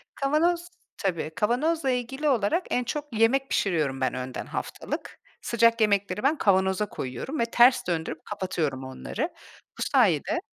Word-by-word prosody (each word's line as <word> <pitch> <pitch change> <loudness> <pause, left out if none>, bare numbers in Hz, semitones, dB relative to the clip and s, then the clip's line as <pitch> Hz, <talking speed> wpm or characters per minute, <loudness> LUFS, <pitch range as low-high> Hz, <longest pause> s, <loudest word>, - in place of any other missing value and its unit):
Kavanoz 335 +5 +1 0.3
tabii 175 -6 -2
kavanozla 270 +7 +1
ilgili 265 +4 -1
olarak 250 - +1
en 250 - +1
çok 290 +5 -3
yemek 250 +5 +2
pişiriyorum 150 -8 0
ben 130 - +1
önden 130 0 -5
haftalık. - - -5 0.2
Sıcak 230 -1 +3
yemekleri 205 +1 +1
ben 295 +3 +3
kavanoza 190 0 +2
koyuyorum 130 - -5
ve 230 - +3
ters 240 -2 +4
döndürüp 160 -2 -3
kapatıyorum 175 -9 -2
onları. 130 - -4 0.5
Bu - - -7
sayede... 230 - +2
225 Hz, 135 wpm, -26 LUFS, 175-270 Hz, 0.5 s, ters